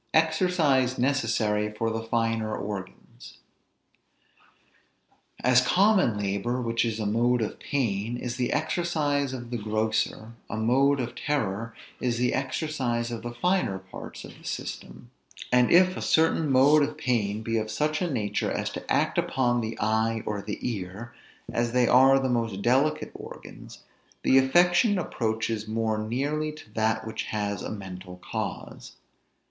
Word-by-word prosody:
EXERCISE 160 -6 +2
NECESSARY 110 -5 +1
FOR 115 0 0
THE 115 0 -2
FINER 115 -1 -1
ORGANS. 95 -10 -8 2.1
As 125 0 +5
common 185 - +3
labor, 100 +5 -1
which 115 -1 0
is 115 -2 -2
a 110 - -2
mode 120 +4 +2
of 105 - -5
pain, 115 -4 -1
is 120 0 -4
the 125 -1 -1
exercise 150 -3 0
of 120 -2 -7
the 120 - -2
grosser, 110 +1 -1 0.2
a 110 - -4
mode 135 +5 +3
of 120 -2 -3
terror 115 -6 -2 0.2
is 120 -2 -1
the 125 +1 +1
exercise 130 -4 -2
of 115 - -4
the 120 - -5
finer 180 - +1
parts 95 0 -10
of - - -13
the - - -19
system; 120 - -6 0.4
and 125 0 +4
if 185 +1 +5
a - - -5
certain 160 -2 +2
mode 140 +4 +6
of 145 - -1
pain 110 -4 -1
be 115 0 -1
of 110 0 -4
such 155 +5 -1
a 180 - 0
nature 110 -8 -1
as - - -2
to - - -7
act - - +2
upon 120 -2 +1
the 110 0 -4
eye 110 +1 +1
or 105 -1 -2
the 105 +1 -5
ear, 105 +1 -5 0.4
as 120 0 0
they 125 -1 +3
are 135 +2 +6
the 135 -1 0
most 115 -5 -1
delicate 140 +5 +2
organs, - - -11 0.4
the 135 - +6
affection 175 - +4
approaches 110 - -2
more 110 0 -1
nearly 140 +8 -1
to 150 -8 -14
that 110 0 0
which 110 0 -4
has 105 -1 -2
a - - -5
mental 95 -3 -8
cause. - - -5
120 Hz, 155 wpm, -27 LUFS, 110-140 Hz, 2.1 s, mode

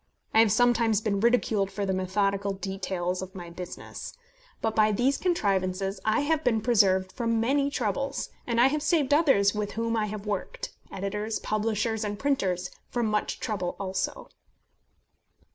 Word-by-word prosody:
I 220 - +5
have 225 -2 +6
sometimes 230 -1 +3
been 210 -2 -1
ridiculed 220 -3 +2
for 200 +1 -3
the 190 - 0
methodical 195 +1 0
details 190 -2 -3
of 190 0 -8
my 175 -2 -8
business. 180 +1 -8 0.5
But 220 -1 -1
by 215 0 +4
these 250 +7 +2
contrivances 195 - 0
I 220 +3 +2
have 310 +1 +1
been 225 -3 +2
preserved 195 -5 +3
from 230 -2 0
many 275 +5 +2
troubles; 275 +2 -2 0.2
and 235 -1 +1
I 240 - +7
have 295 +3 +2
saved 295 -3 +2
others 270 -11 +4
with 210 -1 -3
whom 230 0 -1
I 215 -1 0
have 210 0 -6
worked 210 -1 -4 0.2
editors, 210 +3 -3
publishers, 220 +1 -1
and 205 -1 -3
printers 190 -10 0 0.2
from 240 -1 -1
much 210 -1 -1
trouble 185 -5 -2
also. 190 -1 -3
210 Hz, 160 wpm, -27 LUFS, 195-235 Hz, 0.5 s, I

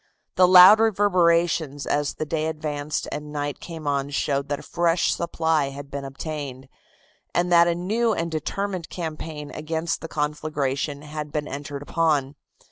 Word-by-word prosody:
The 185 - +5
louder 185 +5 +9
reverberations 170 -7 +2
as 145 -1 -1
the 155 - -3
day 155 +1 -1
advanced 150 -1 -3
and 150 0 -6
night 145 -1 -3
came 165 -3 -8
on 140 -1 0
showed 140 0 -1
that 145 - -1
a - - -15
fresh 170 0 +1
supply 160 -4 0
had 140 0 -9
been 140 -1 -5
obtained, 135 -2 -6 0.7
and 175 0 +1
that 170 0 +6
a 170 - +1
new 220 +7 0
and 170 -5 -2
determined 185 +2 -3
campaign 155 -3 -6
against 160 +2 -3
the 165 - -6
conflagration 150 -2 -2
had 150 0 -6
been 150 -1 -2
entered 140 0 -6
upon. 145 -4 +1
155 Hz, 155 wpm, -24 LUFS, 145-170 Hz, 0.7 s, louder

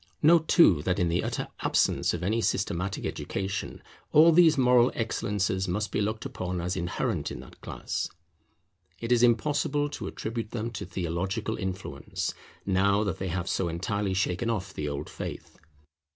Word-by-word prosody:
Note, 160 +1 +6
too, 95 - +6
that 90 +3 0
in 90 -3 +2
the 85 +2 +1
utter - - -2
absence - - +2
of 85 0 -3
any 110 +5 +1
systematic 95 -2 -1
education, 95 0 -4 0.3
all 160 +3 +7
these 165 -2 +6
moral 125 -1 +5
excellences 100 -4 -1
must 105 +4 -1
be - - 0
looked 110 +1 -2
upon 90 0 -3
as 90 +2 -2
inherent 85 -1 -2
in - - -7
the - - -13
class. - - -4 0.9
It 115 +1 -4
is 120 -1 +5
impossible 145 +4 +2
to - - -6
attribute 115 0 -4
them 115 0 -3
to 105 - -6
theological 95 +5 -2
influence, 95 -8 -4 0.3
now 100 +2 +3
that 95 -2 -2
they 95 - -2
have 90 +1 -2
so 95 - 0
entirely 95 +4 -1
shaken 95 +4 0
off 105 -5 -2
the 75 -1 -3
old 70 +1 -4
faith. - - -7
100 Hz, 165 wpm, -28 LUFS, 90-115 Hz, 0.9 s, all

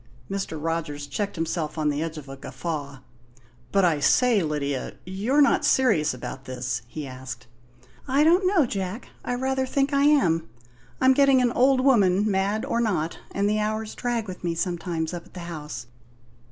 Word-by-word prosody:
Mr. 195 -5 -3
Rogers 155 -2 -3
checked 200 +9 -3
himself 165 -1 -2
on 155 -1 +1
the 145 +1 -1
edge 160 -1 -4
of 145 -2 -9
a 135 - -7
guffaw. 140 -1 -5 0.7
"But, 195 -2 +4
I 160 -4 +2
say, 225 - +4
Lydia, 145 -4 -2
you're 215 +11 +2
not 280 - +3
serious 195 -13 +3
about 130 +1 -7
this?" 125 -2 -3
he 150 +4 -6
asked. 130 -1 -8 0.6
"I 275 +3 +3
don't 355 +4 +4
know, 365 -7 +4
Jack. 195 0 -4
I 245 - -2
rather 265 +1 -1
think 275 +2 0
I 280 0 +4
am. 170 - +3 0.5
I'm 260 0 +5
getting 275 -1 +5
an 245 -1 +2
old 255 +2 +4
woman, 205 -7 +4
mad 200 +3 0
or 235 - 0
not; 180 -8 -1
and 200 +1 0
the 210 +1 +1
hours 215 +1 -2
drag 240 -3 -2
with 185 -1 -8
me 170 -1 -1
sometimes 170 -2 -2
up 175 -1 -7
at - - -22
the 180 - -6
house. 150 -7 -6
185 Hz, 180 wpm, -25 LUFS, 155-245 Hz, 0.7 s, I'm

